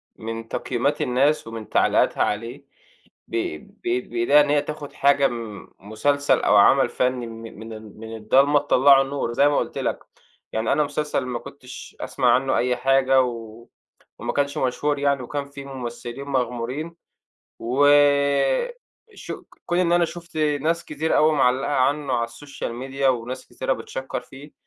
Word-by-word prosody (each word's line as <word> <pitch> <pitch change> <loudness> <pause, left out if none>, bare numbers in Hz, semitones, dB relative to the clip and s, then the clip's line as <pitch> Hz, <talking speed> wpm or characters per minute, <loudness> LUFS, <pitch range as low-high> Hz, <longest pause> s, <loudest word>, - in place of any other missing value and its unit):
من 115 0 -6
تقييمات 130 +5 -1
الناس 135 +3 +1
ومن 115 -1 -8
تعليقاتها - - +2
عليه. 115 +6 -4 0.6
بي 355 0 -2
بي 365 +1 -3
بإيديها 355 - +3
إن 145 - 0
هي 145 -1 +3
تاخد 150 -1 -7
حاجة 140 0 +3
م 115 -4 -7
مسلسل 140 +8 +1
أو - - +3
عمل 135 +7 +5
فني 125 -1 -1
من 115 -2 -10
من 110 0 -8
ال 110 -1 -11
من 110 0 -8
الضلمة 135 +7 +4
تِطَلَّعُه 140 -1 +5
النور، 135 -3 -3
زي 140 +4 +4
ما 145 - +1
قُلت - - -2
لك، - - -1 0.5
يعني 110 +1 0
أنا 150 - +2
مسلسل 145 -2 -2
ما 125 -2 -3
كنتش 130 0 -11
أسمع - - +1
عنه - - +1
أي 125 0 +1
حاجة 135 0 +3
و 115 -2 -6 0.5
وما - - -3
كانش 140 0 -1
مشهور 140 +3 0
يعني، 140 -1 +1
وكان 145 +3 -4
فيه 140 0 -10
ممثلين 125 0 -7
مغمورين. 130 +4 -3 0.7
وشوق 145 - +1 0.2
كون 175 - 0
إن 175 -1 +2
أنا 175 0 +4
شُفت 170 -1 -8
ناس 155 +2 0
كتير 155 +2 -1
أوي 155 +1 +4
معلّقة 135 -1 +2
عنه 140 0 +1
على 115 -1 0
الsocial 140 +4 -8 0.2
media 135 +1 -6
وناس 125 +1 -2
كتيرة 130 - -2
بتشكَّر 130 0 -5
فيه، 140 +3 -14
135 Hz, 155 wpm, -23 LUFS, 120-145 Hz, 0.7 s, عمل